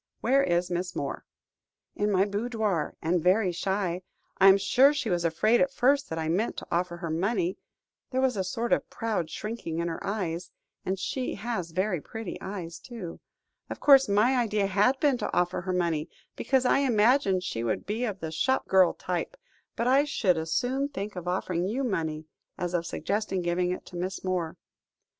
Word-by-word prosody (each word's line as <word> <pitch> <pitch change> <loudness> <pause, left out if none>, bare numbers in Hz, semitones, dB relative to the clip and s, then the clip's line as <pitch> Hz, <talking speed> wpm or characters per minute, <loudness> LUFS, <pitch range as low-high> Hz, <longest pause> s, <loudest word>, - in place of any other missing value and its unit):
Where 275 +1 +4
is 175 -4 0
Miss 180 +1 -2
Moore?" - - -4 0.7
"In 205 0 0
my 190 0 +3
boudoir, 210 -4 -1
and 170 +2 +1
very 185 +2 +3
shy. 185 0 -1 0.4
I 195 - +7
am 195 0 +8
sure 255 +9 +4
she 235 -8 -1
was 175 -1 +1
afraid 215 +8 +3
at 275 - +2
first 275 +2 +2
that 160 - -4
I 160 -1 -2
meant 190 +8 0
to - - -7
offer 175 0 -1
her 170 -2 -4
money, 185 +2 0 0.5
there 260 - -1
was 260 -2 +2
a 190 - 0
sort 230 +6 -1
of - - 0
proud 215 -8 -2
shrinking 210 -6 -5
in 170 0 -1
her 165 - -4
eyes 180 -4 -3 0.3
and 190 +1 -1
she 250 +7 -3
has 200 -5 -3
very 185 0 -1
pretty 225 +2 -7
eyes, 180 -4 -6
too. 225 -9 -8 0.5
Of - - -6
course, 270 -4 +6
my 220 +6 +3
idea 215 -4 +1
had 210 +7 +2
been 280 -5 +2
to - - -2
offer 175 0 +1
her 185 +1 -3
money, 170 -3 0 0.3
because 265 -1 +1
I 250 - +4
imagined 225 -6 +3
she 115 -11 -3
would 115 - -1
be 220 +4 -2
of 200 -4 -4
the 160 -1 -4
shop 260 +12 0
girl 190 -2 +5
type, - - -3 0.4
but 235 - -1
I 270 +3 +4
should 220 -11 +2
as 160 0 -4
soon 260 - 0
think 205 -7 -5
of 180 -1 -6
offering 180 -1 -1
you 250 +7 -1
money, 160 -9 -2 0.3
as 175 0 -3
of 170 -1 -1
suggesting 200 -2 -2
giving 175 +1 0
it 180 - -4
to 180 - -12
Miss 185 +2 -4
Moore." 180 -3 -2
190 Hz, 195 wpm, -28 LUFS, 175-235 Hz, 0.7 s, am